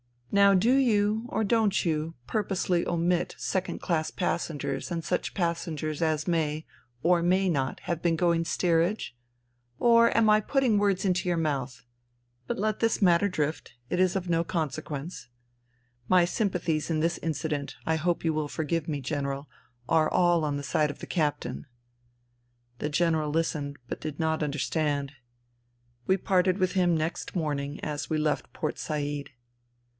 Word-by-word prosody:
Now 200 0 +6
do 220 +7 +4
you, 220 -4 +2
or 220 - -1
don't 210 -3 +2
you, 160 0 -1
purposely 190 - 0
omit 175 +1 0
second 190 0 -2
class 160 -4 0
passengers 150 -6 -2
and 170 -2 -3
such 180 - -2
passengers 165 -3 -2
as 155 -2 0
may, 155 -2 0 0.4
or 175 +1 +4
may 185 +2 +2
not, 135 -5 -1
have 170 -2 -3
been 170 -1 +2
going 170 0 +2
steerage? 170 - +1 0.6
Or 235 - +5
am 225 -1 +5
I 215 0 +6
put 270 +6 0
ting 225 -6 +3
words 200 -2 +1
into 180 -1 +1
your 175 -1 +1
mouth? 140 -6 -2 0.6
But - - -2
let 215 +1 -1
this 225 -1 +1
matter 180 +1 +5
drift: 155 -5 -2 0.2
it 180 - 0
is 185 0 +3
of 185 -2 -2
no 165 0 +2
consequence. 155 -1 -4 0.8
My 180 -1 +5
sympathies 175 -6 -1
in 155 -2 0
this 170 +1 0
incident, 150 -2 -3
I 160 0 +1
hope 170 +2 0
you 165 -1 +1
will 155 -1 -1
forgive 160 +1 -2
me, 145 -3 -2
General, 140 +1 -3 0.4
are 155 +3 +3
all 175 -3 +3
on 145 -1 -1
the 145 - -4
side 150 +2 +1
of 145 - -7
the - - -8
captain." 145 - -2 1.1
The 150 - -2
General 160 -1 +1
listened, 150 -2 -1
but - - -5
did 155 -2 -5
not 160 -1 0
understand. 145 -1 -1 1.0
We 190 - +4
parted 185 0 +2
with 185 -2 +1
him 180 -3 +2
next 160 +4 -3
morning, 145 -3 -2
as 150 0 -4
we 155 - +1
left 150 -2 -1
Port 155 - -3
Said. 145 -2 -3
165 Hz, 160 wpm, -28 LUFS, 150-185 Hz, 1.1 s, Now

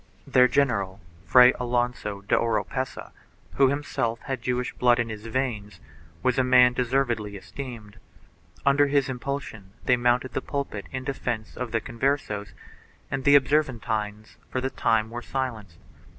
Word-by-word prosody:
Their 125 0 +5
general, 110 -9 0 0.3
Fray 125 0 +7
Alonso 120 -4 -1
de 100 - +1
Oropesa, 115 +3 -2 0.5
who 135 - +6
himself 125 -5 -2
had 135 -4 -4
Jewish 125 +1 -2
blood 120 -1 +3
in 120 -1 -1
his 110 0 -7
veins, 115 -4 -3 0.4
was 130 0 +2
a - - +4
man 125 -1 +6
deservedly 120 -5 0
esteemed; 115 -1 -9 0.7
under 140 +1 +4
his 140 -1 +1
impulsion 125 -6 -5
they 125 - +4
mounted 125 +1 +1
the - - -1
pulpit 130 - -4
in 130 0 -4
defence 120 -5 -4
of 125 -2 -5
the 115 - +1
Conversos 115 -4 -2 0.6
and 135 -1 -3
the 145 0 +7
Observantines 115 -7 0
for 130 - -2
the 130 +1 -2
time 110 -1 +1
were 120 +1 -5
silenced. 115 -10 -4
125 Hz, 145 wpm, -26 LUFS, 110-130 Hz, 0.7 s, Fray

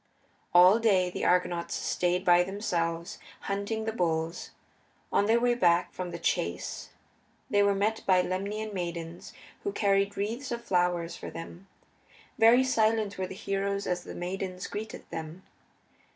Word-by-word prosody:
All 180 +5 +7
day 190 -6 +3
the - - -4
Argonauts 180 -1 +1
stayed 180 +1 0
by 175 0 +6
themselves, 170 -3 -2 0.2
hunting 200 +3 -3
the 220 - -1
bulls. 165 -4 -1 0.6
On 205 - +3
their 230 +2 +4
way 245 0 +3
back 175 -7 +2
from 185 -1 -5
the 170 - -5
chase 85 - -2 0.6
they 205 - +4
were 200 0 +3
met 215 +3 0
by 185 -1 +5
Lemnian 205 +4 -3
maidens 170 -2 -5 0.3
who 400 - -1
carried 200 - +1
wreaths 230 +7 -3
of 235 0 -3
flowers 175 -2 +1
for - - -7
them. 175 +3 -9 0.7
Very 235 +3 +7
silent 220 -5 +1
were 185 - -1
the 190 - -8
heroes 200 0 -2
as 180 0 -2
the - - -9
maidens 185 +1 -4
greeted 215 +2 -7
them. 160 +3 -6
190 Hz, 150 wpm, -29 LUFS, 175-210 Hz, 0.7 s, All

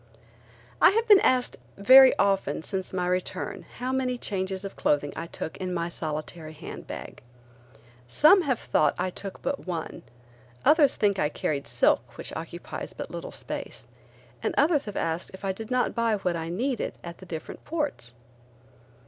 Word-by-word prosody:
I - - +9
have 450 +4 +1
been 410 -2 +9
asked 255 -6 +2 0.2
very 260 +6 +8
often 195 -4 +1
since 190 0 -2
my 180 -1 -1
return 180 0 -3
how 250 +1 -2
many 255 -1 0
changes 190 -3 -3
of 195 - -7
clothing 145 -1 +1
I 165 - -5
took 160 - -6
in 185 -1 -3
my 170 0 -1
solitary 155 0 -5
hand 155 - -9
bag. - - -8 0.9
Some 310 - +6
have 270 -7 0
thought - - +1
I 185 - -1
took 195 +1 -7
but 275 -8 -3
one; 170 -3 -4 0.6
others 300 -3 +5
think 200 -2 +1
I 150 - +2
carried 145 -2 -2
silk - - +1
which - - -5
occupies - - -6
but - - -6
little - - -6
space, 120 - -6 0.5
and - - -1
others 295 0 +3
have 205 - -6
asked 165 +1 -2
if 195 - -9
I 195 - +1
did 220 +3 -7
not 250 -1 +1
buy 230 -2 +1
what 180 -4 -1
I 165 0 -4
needed 240 +8 -2
at 170 0 -8
the 185 - -12
different 160 -2 -7
ports. 290 - -3
195 Hz, 170 wpm, -27 LUFS, 170-255 Hz, 0.9 s, I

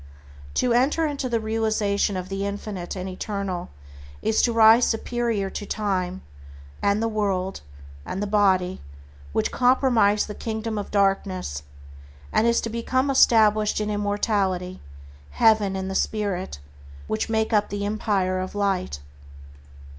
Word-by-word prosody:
To 245 - +2
enter 275 +7 +2
into 285 -3 -2
a - - +2
realization 220 -3 0
of 185 0 -5
the 195 0 -3
Infinite 200 -3 -5
and 185 0 -5
Eternal 190 -1 -4 0.5
is 220 - +2
to 240 - +2
rise 230 +1 +6
superior 225 -3 -1
to 205 - -5
time, 190 -3 -2 0.6
and 200 +2 +1
the - - +1
world, 195 -4 -1 0.4
and 185 - -5
the 205 - -1
body, 190 -3 +2 0.5
which - - 0
comprise 245 -5 +3
the 210 - -7
kingdom 220 0 -4
of 200 - -6
darkness; 195 - 0 0.7
and 225 - +3
is 235 - +3
to 230 - -3
become 260 +4 0
established 215 -5 +4
in 210 0 -2
immortality, 205 -3 -1 0.6
Heaven, 215 -3 +4
and 190 0 -3
the 190 - -4
Spirit, 195 - -2 0.5
which 110 - -2
make 220 0 0
up 210 -1 +2
the 200 0 -3
Empire 200 -3 0
of 185 +2 -5
Light. 190 - -1
205 Hz, 140 wpm, -24 LUFS, 190-225 Hz, 0.7 s, rise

